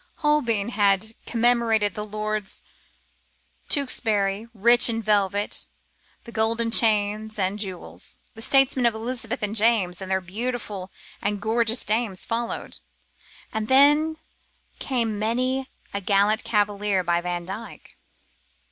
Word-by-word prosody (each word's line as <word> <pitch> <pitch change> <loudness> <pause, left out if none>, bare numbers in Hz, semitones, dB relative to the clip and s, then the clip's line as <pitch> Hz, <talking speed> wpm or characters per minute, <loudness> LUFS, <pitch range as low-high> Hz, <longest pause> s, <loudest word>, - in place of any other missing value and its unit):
Holbein 245 -9 +1
had 205 -1 +1
commemorated 230 -3 +2
the 210 - -4
Lords 215 -1 -3 1.1
Tewkesbury, 220 -7 +2
rich 235 +3 +5
in 225 -1 -2
velvet, 205 -1 0 0.6
and 235 - -11
golden 230 +1 0
chains, 215 -1 +2
and 195 +1 -1
jewels. 175 - -5 0.2
The 225 - -11
statesmen 270 0 +4
of 230 - 0
Elizabeth 230 +1 -2
and 210 +1 -2
James, 205 -5 +2
and 190 - -6
their 190 0 +1
beautiful 205 0 -5 0.3
and 205 0 -1
gorgeous 230 +3 +1
dames, 215 -3 -1
followed; 230 +1 -4 0.7
and 220 -1 -2
then 295 +4 +5 0.6
came 230 -6 -1
many 255 +4 -1 0.2
a 200 - -2
gallant 205 +3 +2
cavalier, 205 -2 0
by 170 0 +1
Vandyke. 180 +5 -7
220 Hz, 115 wpm, -24 LUFS, 200-235 Hz, 1.1 s, rich